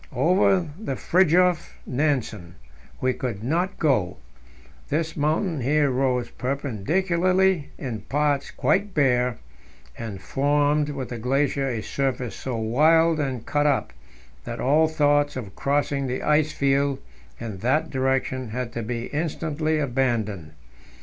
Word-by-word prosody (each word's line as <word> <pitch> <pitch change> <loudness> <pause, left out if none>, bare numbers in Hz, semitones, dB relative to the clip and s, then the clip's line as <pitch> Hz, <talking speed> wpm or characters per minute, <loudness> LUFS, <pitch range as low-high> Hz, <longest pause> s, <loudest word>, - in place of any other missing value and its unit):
Over 185 +2 +3 0.2
by 175 -11 -3
Fridtjof 180 +1 +2
Nansen 125 - -1 0.5
we 130 0 +2
could 115 -5 -4
not 175 +9 -1
go; 130 - +1 0.7
this 160 +2 -1
mountain 155 +1 0
here 145 +2 +2
rose 125 -1 0
perpendicularly, 170 - 0
in 120 -7 -5
parts 145 +4 0
quite 200 0 0
bare, 125 -4 +2 0.6
and 110 -4 -6
formed 145 +4 +1
with 135 -3 -5
the 120 - -5
glacier 135 +3 0
a 115 -3 -3
surface 130 -3 -2
so 130 -3 -4
wild 155 +8 +3
and 130 -5 -3
cut 145 0 +1
up 140 - 0 0.5
that - - -6
all 150 +4 +3
thoughts 145 -2 +2
of 105 -7 -7
crossing 140 -1 0
the 125 0 -3
ice 150 0 +2
field 140 0 +1 0.4
in 110 -5 -6
that 150 +9 +1
direction 130 -2 -1
had 120 +1 -4
to 120 - -3
be 115 +1 -3
instantly 155 0 -1
abandoned. 120 - -1
140 Hz, 130 wpm, -24 LUFS, 125-155 Hz, 0.7 s, Over